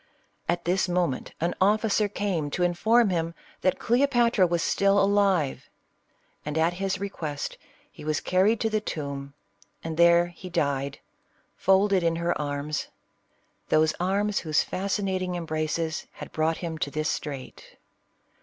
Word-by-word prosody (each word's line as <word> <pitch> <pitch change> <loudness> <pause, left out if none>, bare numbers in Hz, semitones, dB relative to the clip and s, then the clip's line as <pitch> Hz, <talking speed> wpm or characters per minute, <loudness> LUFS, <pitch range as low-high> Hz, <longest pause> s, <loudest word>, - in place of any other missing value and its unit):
At 170 0 0
this 180 +1 +1
moment, 175 -7 -1
an 170 +2 0
officer 210 +1 +3
came 190 -7 -2
to 180 - +1
inform 210 +5 +3
him 165 -1 -1 0.3
that 185 - +2
Cleo 250 +5 +2
patra 235 -7 +3
was 170 -1 0
still 200 0 +3
alive; 195 -7 +2 0.7
and 150 +1 -3
at 165 +2 +2
his 195 -1 -1
request 160 -7 -4 0.4
he - - -12
was 150 -1 0
carried 200 +5 +2
to 225 - +1
the 215 0 +1
tomb, 140 -6 -5 0.5
and 160 -1 -4
there 170 0 +6
he 175 +1 -10
died 140 -5 -1 0.6
folded 195 0 +3
in 165 -1 +1
her 170 +1 0
arms 145 +1 -3 0.4
— - - -42
those 155 0 +3
arms 200 +3 +1
whose 155 -3 +1
fascinating 190 -1 -2
embrace 160 -1 -2
had - - -9
brought 160 +1 0
him 165 -2 -5
to 145 - -1
this 155 +2 -2
strait. 140 -4 -5
175 Hz, 145 wpm, -26 LUFS, 155-195 Hz, 0.7 s, there